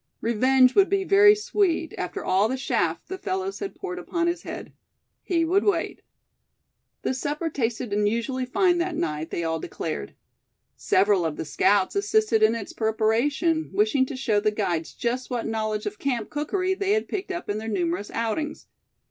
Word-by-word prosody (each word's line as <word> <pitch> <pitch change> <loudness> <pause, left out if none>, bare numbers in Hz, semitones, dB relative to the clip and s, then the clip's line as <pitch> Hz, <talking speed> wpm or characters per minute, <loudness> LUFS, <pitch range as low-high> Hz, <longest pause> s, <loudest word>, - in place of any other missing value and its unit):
Revenge 255 +3 +4
would 395 -1 +5
be 395 -1 +1
very 410 +2 +6
sweet, 405 -7 0
after 180 - -5
all 195 +4 +3
the 260 - -1
chaff 260 - -1
the 380 - -6
fellows 380 +1 -3
had 400 -1 -5
poured 365 -2 -5
upon 340 -2 -2
his 345 0 -1
head. - - -8 0.5
He 335 -3 +1
would 375 +5 +2
wait. 350 -5 0 1.0
The - - 0
supper 300 +5 -2
tasted 240 -4 -2
unusually 230 +5 0
fine 355 +4 +2
that 345 -1 -1
night, 155 - -2
they 170 - -3
all 160 0 -1
declared. 70 - -5 0.6
Several 195 -1 +2
of 160 -2 -2
the - - -5
scouts 190 - +2
assisted 410 - +2
in 220 +1 +4
its 220 -4 -6
preparation, 235 +9 +1
wishing 380 -11 +2
to 275 - -6
show 225 -5 +1
the 210 - +2
guides 180 -6 -2
just 245 +1 -2
what 245 -2 -2
knowledge 215 -1 -2
of 415 - -5
camp 245 -6 -2
cookery 370 +6 -1
they 395 +1 0
had 435 - 0
picked 390 -1 -4
up 350 -1 -5
in 205 +1 -2
their 220 - -6
numerous 185 -1 -1
outings. 300 +8 -3
260 Hz, 175 wpm, -25 LUFS, -, 1.0 s, very